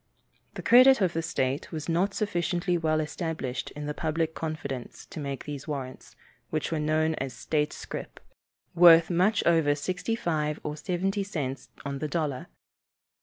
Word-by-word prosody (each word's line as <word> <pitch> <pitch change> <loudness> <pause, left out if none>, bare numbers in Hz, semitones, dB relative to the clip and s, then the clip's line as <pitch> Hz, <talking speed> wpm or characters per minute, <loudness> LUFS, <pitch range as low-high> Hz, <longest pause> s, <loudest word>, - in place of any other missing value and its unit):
The - - -6
credit 255 +2 +7
of 185 -4 +1
the 165 - 0
state 140 -4 -2
was 155 -2 -5
not 180 +4 +1
sufficiently 175 -3 0
well 160 -2 +1
established 155 -4 -3
in 150 0 -5
the 150 - -2
public 160 +1 -1
confidence 140 -6 -5
to - - -9
make 140 -2 -5
these 145 -1 -6
warrants, 135 -4 -6 0.3
which - - -2
were 160 - 0
known 155 +1 +1
as 135 -2 -3
"state 150 +3 -1
scrip," - - -7 0.5
worth 170 0 +7
much 190 +5 +3
over 160 -4 +4
sixty 180 +9 -2
five 155 -8 -1
or 150 - -3
seventy 195 +4 -1
cents 145 -9 -4 0.2
on 140 -1 -3
the 155 - -2
dollar. 145 -4 -2
160 Hz, 160 wpm, -28 LUFS, 150-175 Hz, 0.5 s, credit